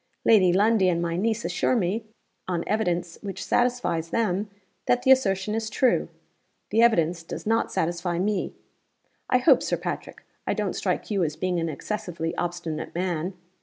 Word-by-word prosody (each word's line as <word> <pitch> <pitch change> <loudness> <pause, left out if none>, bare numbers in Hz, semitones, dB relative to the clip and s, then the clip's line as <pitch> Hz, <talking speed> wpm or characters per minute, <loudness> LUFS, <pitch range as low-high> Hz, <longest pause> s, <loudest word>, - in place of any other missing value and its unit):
Lady 195 -6 +6
Lundie 200 0 +4
and 170 -1 +1
my 170 -1 -1
niece 220 +5 0
assure - - +1
me, 210 +1 0 0.4
on 175 -2 -1
evidence 175 -5 -1
which 200 -2 -6
satisfies 245 -10 +1
them, 205 -2 0 0.4
that 245 0 +2
the 265 - +5
assertion 205 -6 +3
is 220 0 -2
true. 250 +4 +2 0.6
The 225 - +4
evidence 175 -7 +3
does 165 - -7
not 225 +1 +1
satisfy 175 +1 -1
me. 200 +2 -1 0.7
'I - - +5
hope, - - +5
Sir - - -1
Patrick, - - -6 0.2
I - - +1
don't - - -1
strike - - -2
you 195 -3 +1
as 155 -2 -1
being 180 +2 -1
an 165 0 -1
excessively 170 -1 -4
obstinate 175 -3 -4
man? 180 0 -2
185 Hz, 165 wpm, -25 LUFS, 170-220 Hz, 0.7 s, Lady